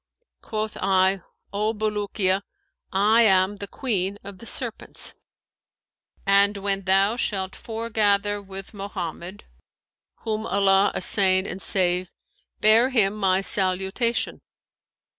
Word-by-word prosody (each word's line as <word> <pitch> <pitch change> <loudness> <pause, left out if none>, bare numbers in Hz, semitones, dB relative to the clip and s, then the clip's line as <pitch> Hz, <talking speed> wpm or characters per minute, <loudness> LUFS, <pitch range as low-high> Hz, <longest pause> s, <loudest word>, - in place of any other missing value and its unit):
Quoth 215 -1 -4
I, 190 0 +2 0.3
'O 215 +2 0
Bulukiya, 205 -2 0 0.5
I 210 +4 +4
am 190 -2 +4
the 200 - -5
Queen 200 -5 -2
of 195 -1 -10
the 230 - -10
Serpents; 240 -4 -1 1.1
and 200 +1 +4
when 195 -1 -2
thou 195 +3 +3
shalt 195 -5 -2
foregather 210 -3 0
with 195 0 -9
Mohammed 195 -1 -6 0.8
(whom 220 0 -3
Allah 195 0 +3
assain 185 0 +2
and 190 0 -6
save!) 180 -1 0 0.5
bear 225 +4 +5
him 215 -6 +2
my 190 -2 +1
salutation.' 195 +5 -1
200 Hz, 105 wpm, -24 LUFS, 190-215 Hz, 1.1 s, bear